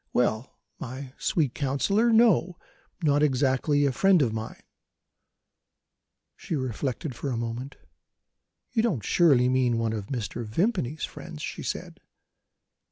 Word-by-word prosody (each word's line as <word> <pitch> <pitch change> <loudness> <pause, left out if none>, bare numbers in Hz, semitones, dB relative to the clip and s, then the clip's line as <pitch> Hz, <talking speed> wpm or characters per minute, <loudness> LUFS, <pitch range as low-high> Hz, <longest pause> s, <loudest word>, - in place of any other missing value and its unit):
Well, 120 0 0 0.2
my 130 +1 -7
sweet 145 -7 0
counsellor, 195 - +1
no 220 -6 +4 0.5
not 145 -1 +3
exactly 145 +1 +2
a 140 - +2
friend 185 +3 +4
of 115 -4 -1
mine." 110 0 -6 1.7
She - - -4
reflected 130 +1 -3
for 130 +4 -4
a 120 - -2
moment. 120 +4 -5 1.0
"You 225 - +2
don't 185 - 0
surely 140 -8 +4
mean 125 -2 +2
one 115 -1 0
of 105 -3 -5
Mr. 120 -2 -4
Vimpany's 155 - -1
friends?" 160 -3 -9
she - - -5
said. - - -5
135 Hz, 125 wpm, -27 LUFS, 120-160 Hz, 1.7 s, no